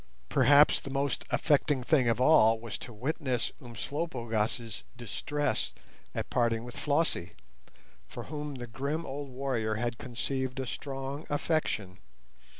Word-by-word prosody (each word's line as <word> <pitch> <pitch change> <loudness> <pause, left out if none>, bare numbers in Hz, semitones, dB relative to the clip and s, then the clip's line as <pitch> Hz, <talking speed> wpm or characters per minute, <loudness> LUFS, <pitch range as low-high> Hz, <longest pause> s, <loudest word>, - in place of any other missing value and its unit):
Perhaps 145 +3 +6
the - - -7
most 140 0 -1
affecting 145 -3 +2
thing 130 -3 +4
of 115 - +1
all 115 -5 +6
was 115 -1 -6
to - - -8
witness 130 +1 -1
Umslopogaas' 115 -3 -2
distress 125 +2 -2 0.4
at - - -3
parting 115 -2 +2
with 120 0 -8
Flossie, 145 - 0 0.7
for - - -7
whom 150 -1 -5
the 120 -1 -5
grim 140 +7 -3
old 140 +1 -5
warrior 125 -5 -1
had 120 +1 -2
conceived 130 +1 -2
a 130 - -1
strong 135 +3 -5
affection. 145 - 0
130 Hz, 130 wpm, -30 LUFS, 115-145 Hz, 0.7 s, Perhaps